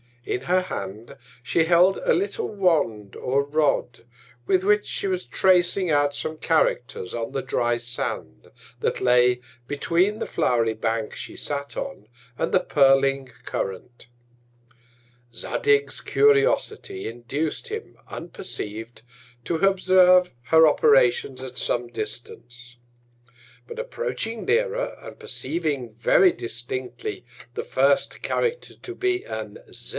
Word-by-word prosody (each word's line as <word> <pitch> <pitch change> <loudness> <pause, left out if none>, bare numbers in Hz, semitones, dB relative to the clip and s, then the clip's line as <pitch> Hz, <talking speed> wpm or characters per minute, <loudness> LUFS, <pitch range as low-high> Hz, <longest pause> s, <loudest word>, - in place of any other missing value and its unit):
In 125 - -2
her 180 +7 +2
Hand 110 - -6 0.3
she 160 +6 +2
held 180 +3 +5
a - - +1
little 410 +4 -1
Wand 150 - 0
or 135 +2 0
Rod, 145 -5 0 0.4
with 185 -1 +3
which 210 +1 +3
she - - -2
was 185 -1 -1
tracing 180 0 +2
out 145 -1 +2
some 155 +2 -4
Characters 140 - 0
on 115 0 -3
the 135 - -1
dry 120 -2 0
Sand, 120 - -3 0.3
that - - -1
lay 125 0 +4 0.3
between 175 +8 +1
the - - -3
flow'ry 115 -2 +1
Bank 110 0 -2
she - - -8
sat 140 -1 -4
on, 275 - -6 0.3
and - - -1
the - - +4
purling 135 -1 +3 0.2
Current. 100 +7 -5 1.3
Zadig's 425 - +1
Curiosity 430 -2 +2
induc'd 125 +7 -4
him, 440 +1 -7
unperceiv'd, 115 - -6 0.4
to 170 - -1
observe 185 -1 +4
her 160 +4 +6
Operations 130 -3 +3
at 130 -1 -8
some 120 0 0
Distance. 120 +2 -8 0.9
But 465 0 -8
approaching 475 - -4
nearer, - - 0
and - - -11
perceiving 155 - -3
very 120 - +4
distinctly 125 - -5 0.3
the 450 - -3
first - - +1
Character 480 0 -1
to 365 - -7
be 375 0 0
an 485 - -6
Z. - - -8
150 Hz, 120 wpm, -24 LUFS, -, 1.3 s, her